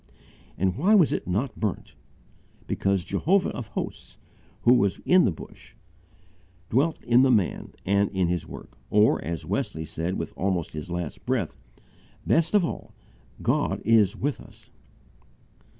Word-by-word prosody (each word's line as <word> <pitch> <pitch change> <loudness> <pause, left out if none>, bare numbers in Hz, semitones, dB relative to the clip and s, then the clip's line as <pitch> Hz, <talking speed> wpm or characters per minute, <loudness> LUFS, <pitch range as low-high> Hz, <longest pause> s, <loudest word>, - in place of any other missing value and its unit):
And 95 0 0
why 195 +10 +4
was 180 -8 +5
it - - -3
not 105 +10 -2
burnt? 105 -4 -3 0.7
Because 100 -2 0
Jehovah 180 - +1
of 120 - -6
hosts, - - -6 0.5
who 120 - +6
was 100 -6 +2
in 185 0 +5
the - - +2
Bush, 80 - -12 1.0
dwelt 145 +7 +1
in 120 +1 +4
the 135 - +4
man 105 -8 0
and 100 +1 +2
in 95 -2 0
his 90 0 -2
work: - - -11
or, 105 +1 +3
as 85 +3 -4
Wesley 80 +1 -2
said 80 +4 -3
with - - -5
almost 95 -3 -1
his 75 +3 -6
last 85 -3 -5
breath, 120 -10 -1 0.7
"Best 165 +5 +2
of 200 -4 +4
all, - - -7 0.5
God - - +1
is 110 -2 +4
with 140 +5 -2
us." - - -17
100 Hz, 150 wpm, -26 LUFS, 90-130 Hz, 1.0 s, who